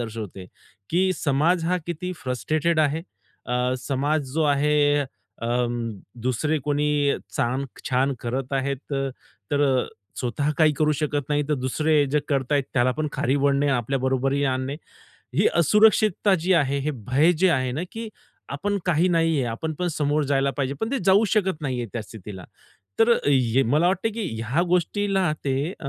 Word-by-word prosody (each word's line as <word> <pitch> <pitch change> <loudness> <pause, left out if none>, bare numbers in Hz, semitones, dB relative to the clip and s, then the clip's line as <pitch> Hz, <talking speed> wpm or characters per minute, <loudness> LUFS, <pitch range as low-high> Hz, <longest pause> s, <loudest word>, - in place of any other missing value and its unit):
दर्शवते 110 -5 -6 0.4
की 185 +3 +2
समाज 160 +4 +1
हा 180 +2 +1
किती 180 +2 -4
फ्रस्ट्रेटेड 155 +6 -1
आहे. 155 +2 +1 0.4
अ, 125 +1 0
समाज 140 +2 -1
जो 160 - +2
आहे 145 0 +2 0.4
अ, 115 - -1 0.8
दुसरे 150 +5 0
कोणी 145 -1 +1 0.2
चांग 130 +3 0 0.3
छान 135 +2 +2
करत 130 +3 -3
आहेत 135 0 0
तर, 135 -1 -1 0.4
तर 145 0 +1 0.2
अ, - - -6 0.3
स्वतः 140 +4 -1
काही 155 -1 +5
करू 155 0 +3
शकत 145 -1 -2
नाही, 150 0 +1
तर 150 - +2
दुसरे 150 +3 +2
जे 150 - +3
करताय 140 0 +1
त्याला 125 0 +3
पण 155 -1 0
खाली 135 +4 0
ओढणे, 140 +1 +2
आपल्या 135 +4 -1
बरोबरीला 135 +2 +1
आणणे. 130 +2 -3 0.6
ही - - +3
असुरक्षितता 210 +2 +4
जी 180 +4 +1
आहे, 140 -4 +2
हे 145 +2 -1 0.2
भय 150 +7 +4
जे 185 +3 +2
आहे 130 -5 0
ना, 155 +6 -3
की 225 0 -5 0.4
आपण 200 +8 -1
काही 175 +1 +3
नाहीये, 165 -5 +2
आपण 140 +8 -3
पण 180 - 0
समोर 150 -1 0
जायला 135 0 +2
पाहिजे. 140 -1 -1
पण 220 - -1
ते 275 - +1
जाऊ 195 +3 +5
शकत 190 -6 0
नाहीये 125 -4 -2
त्या 115 - -3
स्थितीला. 100 -3 -10 0.5
तर 225 +1 +5 0.2
हे 130 -2 +3
मला 150 +8 +3
वाटतं 190 +4 0
की 225 -2 -3 0.2
ह्या 135 +10 +1
गोष्टीला 190 -1 +1
ते 135 -1 0 0.2
अ, 140 - -4
145 Hz, 165 wpm, -24 LUFS, 130-165 Hz, 0.8 s, काही